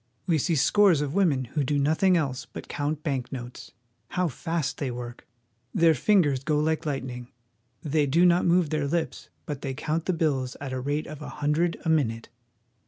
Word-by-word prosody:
We 165 -3 +2
see 165 +4 +1
scores 185 +2 +4
of 145 -1 -2
women 160 -9 +2
who 145 +5 -2
do 145 +2 0
nothing 160 +6 +3
else 135 -5 -2
but - - -8
count 150 +1 -3
bank 135 -5 -2
notes. 125 -2 -8 0.4
How 180 +5 0
fast 160 +1 -3
they 140 - -1
work! 120 0 -7 0.5
Their 165 -1 +5
fingers 145 -4 +2
go 150 +1 +1
like 155 +1 0
light 140 -3 -1
ning. 125 -1 -7 0.5
They 150 0 +1
do 165 +6 +4
not 175 0 +4
move 170 -3 +3
their 150 -2 0
lips, 165 +2 -2 0.2
but 145 -2 -5
they 135 -2 -4
count 155 +3 -2
the 185 - +2
bills 140 -6 -1
at 140 -2 -5
the 130 - -2
rate 145 +3 -1
of 155 -1 -9
a - - -6
hundred 150 +4 0
a - - +1
minute. 115 -8 0
150 Hz, 195 wpm, -26 LUFS, 135-165 Hz, 0.5 s, Their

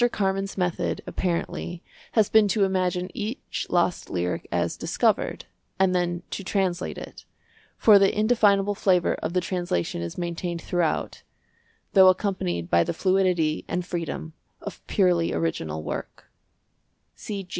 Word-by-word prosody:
Carman's 195 -2 -1
method, 180 -2 -1
apparently, 175 -1 -3 0.3
has 215 -3 +4
been 220 -1 +5
to 200 +1 +2
imagine 185 -1 0
each 225 +2 -4
lost 175 0 +1
lyric 90 0 -2
as - - 0
discovered, - - 0 0.3
and 190 -1 +3
then 175 -1 -1
to 195 - -4
translate 190 -2 -1
it; - - -9 0.5
for 210 -3 +7
the 195 0 +4
indefinable 205 -3 +3
flavour 185 -3 +2
of 170 - -3
the 180 - +2
translation 175 - -2
is 85 0 -5
maintained 170 0 -3
throughout, 175 -3 -1 0.7
though 190 -1 +8
accompanied 185 - +1
by 85 0 +4
the - - -3
fluidity 185 -5 +1
and 180 0 -2
freedom 165 -2 -4 0.3
of - - -8
purely 180 -5 +2
original 80 -1 -2
work. - - -6
180 Hz, 130 wpm, -25 LUFS, 170-195 Hz, 0.7 s, though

